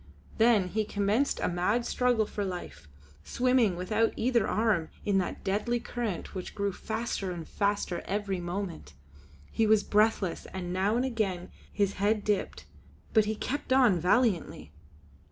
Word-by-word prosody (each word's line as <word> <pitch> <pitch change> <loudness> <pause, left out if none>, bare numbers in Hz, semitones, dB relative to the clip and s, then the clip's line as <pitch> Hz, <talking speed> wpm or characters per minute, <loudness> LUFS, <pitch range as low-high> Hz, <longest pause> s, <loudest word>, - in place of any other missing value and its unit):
Then 220 -5 +4
he 215 +3 0
commenced 210 +6 0
a - - +1
mad 195 +7 0
struggle 245 -3 +2
for 205 - -4
life, 130 - -6 0.4
swimming 245 - +2
without 215 +6 0
either 240 0 +1
arm 210 -7 +1 0.2
in 200 -2 +3
that 180 - -4
deadly 215 +5 0
current 235 -6 -4
which 185 -2 -6
grew 200 0 0
faster 220 -1 -3
and 170 -3 -6
faster 200 -4 -1
every 195 -1 -2
moment. 175 - -5 0.6
He 225 - +1
was 215 -1 +4
breathless, 210 -4 +1
and 180 -1 -5
now 195 +4 +1
and 245 +2 +1
again 200 -8 -2 0.2
his 200 -1 0
head 210 +1 +2
dipped; 210 -2 -1 0.5
but 220 -2 +5
he 215 +1 -1
kept 270 +5 -4
on 250 -9 +5
valiantly. 180 - +1
205 Hz, 150 wpm, -29 LUFS, 185-225 Hz, 0.6 s, but